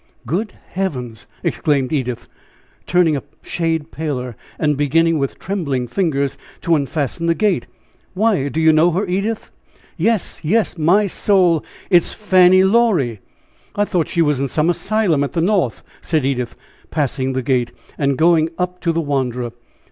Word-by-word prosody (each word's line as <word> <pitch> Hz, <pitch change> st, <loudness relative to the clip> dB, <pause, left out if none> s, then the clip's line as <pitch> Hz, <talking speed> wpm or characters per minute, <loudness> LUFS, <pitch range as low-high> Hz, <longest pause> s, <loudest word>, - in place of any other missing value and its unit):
"Good 195 Hz, +6 st, -2 dB, 0.2 s
heaven!" 130 Hz, -12 st, -3 dB, 0.3 s
exclaimed 140 Hz, -2 st, 0 dB
Edith, 125 Hz, -5 st, -2 dB, 0.6 s
turning 175 Hz, -4 st, +3 dB
a 140 Hz, -, -2 dB, 0.2 s
shade 165 Hz, -2 st, -2 dB
paler, 130 Hz, -6 st, -4 dB, 0.2 s
and 150 Hz, -2 st, +1 dB
beginning, 160 Hz, +3 st, +2 dB
with 135 Hz, -1 st, -2 dB
trembling 145 Hz, -11 st, -2 dB
fingers, 140 Hz, -5 st, -1 dB, 0.2 s
to 170 Hz, -2 st, +2 dB
unfasten 145 Hz, +3 st, -2 dB
the 165 Hz, -, +3 dB
gate. 195 Hz, -, +1 dB, 0.5 s
"Why, 195 Hz, -9 st, +1 dB
do 160 Hz, -, -3 dB
you 160 Hz, 0 st, +5 dB
know 160 Hz, +3 st, +5 dB
her, 195 Hz, +5 st, 0 dB
Edith?" 200 Hz, +4 st, -2 dB, 0.5 s
"Yes! 210 Hz, +2 st, 0 dB
yes! 205 Hz, +7 st, +1 dB
My 180 Hz, +6 st, +3 dB
soul, 180 Hz, -4 st, +2 dB, 0.3 s
it 180 Hz, -, +8 dB
is -, -, -7 dB
Fanny 185 Hz, -2 st, +5 dB
Laurie! 190 Hz, -, +2 dB, 0.6 s
I 205 Hz, -, +2 dB
thought 175 Hz, -5 st, 0 dB
she 170 Hz, -, +1 dB
was 150 Hz, -3 st, +1 dB
in 140 Hz, -, 0 dB
some 155 Hz, +6 st, +1 dB
asylum 185 Hz, -5 st, +1 dB
at 140 Hz, -, -4 dB
the 170 Hz, -, 0 dB
North!" 180 Hz, -, +1 dB, 0.2 s
said 155 Hz, -5 st, 0 dB
Edith, 125 Hz, -3 st, -2 dB, 0.3 s
passing 135 Hz, -3 st, -1 dB
the 130 Hz, 0 st, -2 dB
gate, 125 Hz, -2 st, 0 dB, 0.2 s
and 140 Hz, -2 st, 0 dB
going 165 Hz, -1 st, +4 dB
up 180 Hz, 0 st, -3 dB
to 170 Hz, -, +1 dB
the 165 Hz, 0 st, 0 dB
wanderer. 125 Hz, -5 st, -2 dB
160 Hz, 155 wpm, -19 LUFS, 140-185 Hz, 0.6 s, it